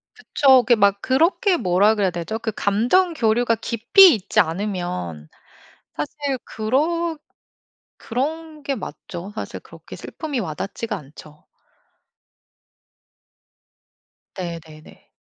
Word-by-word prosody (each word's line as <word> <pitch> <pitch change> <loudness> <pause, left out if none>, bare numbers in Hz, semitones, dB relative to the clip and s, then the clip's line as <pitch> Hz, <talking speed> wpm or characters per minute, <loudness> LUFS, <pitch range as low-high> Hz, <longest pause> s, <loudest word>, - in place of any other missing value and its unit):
그쵸. 265 -3 +4
그게 240 - +4
막 200 -2 +2
그렇게 335 - +2
뭐라 195 - +3
그래야 200 -3 +1
되죠? 175 +5 -4
그 225 -1 -4
감정 245 - +2
교류가 230 -3 +1
깊이 240 - +5
있지 205 -3 0
않으면 160 - -3 0.7
사실 275 - -3
그러 315 +9 -1 0.8
그런 305 +5 -4
게 280 -1 -2
맞죠. 190 -5 -8
사실 - - -6
그렇게 - - -13
슬픔이 295 -5 -5
와 165 -8 -4
닿지가 210 +6 -5
않죠. 150 -2 -13 3.0
네네네. 165 -3 -9
220 Hz, 210 characters per minute, -21 LUFS, 180-280 Hz, 3.0 s, 깊이